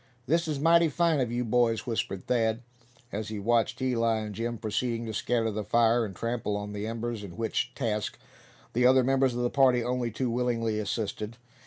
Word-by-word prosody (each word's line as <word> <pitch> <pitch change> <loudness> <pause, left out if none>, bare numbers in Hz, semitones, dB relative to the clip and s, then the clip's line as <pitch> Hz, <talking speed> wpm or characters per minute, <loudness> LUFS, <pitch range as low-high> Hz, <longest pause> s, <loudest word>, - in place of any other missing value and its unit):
"This 165 +5 +1
is 150 -3 -2
mighty 165 +2 +5
fine 165 0 +2
of 125 -3 0
you 120 +1 -1
boys," 115 -1 +2
whispered 110 -5 -3
Thad, 115 -1 +1 0.5
as 105 +1 -4
he 110 - -5
watched 115 +3 +1
Eli 115 -3 +2
and 105 -1 -5
Jim 115 +3 -3
proceeding 115 +2 -2
to 110 - -5
scatter 115 +1 0
the 105 0 -3
fire, 115 +2 +3
and 95 -3 -8
trample 115 -2 -2
on 105 0 -5
the 105 +1 -4
embers; 115 -1 -4
in 95 -1 -9
which 115 -1 -1
task 105 -5 -2 0.6
the 125 +1 +4
other 130 0 +5
members 135 -1 +2
of 120 - -1
the 120 - 0
party 130 -3 +4
only 125 0 -1
too 120 +2 -2
willingly 115 -3 0
assisted. 110 +1 -3
115 Hz, 195 wpm, -28 LUFS, 110-125 Hz, 0.6 s, mighty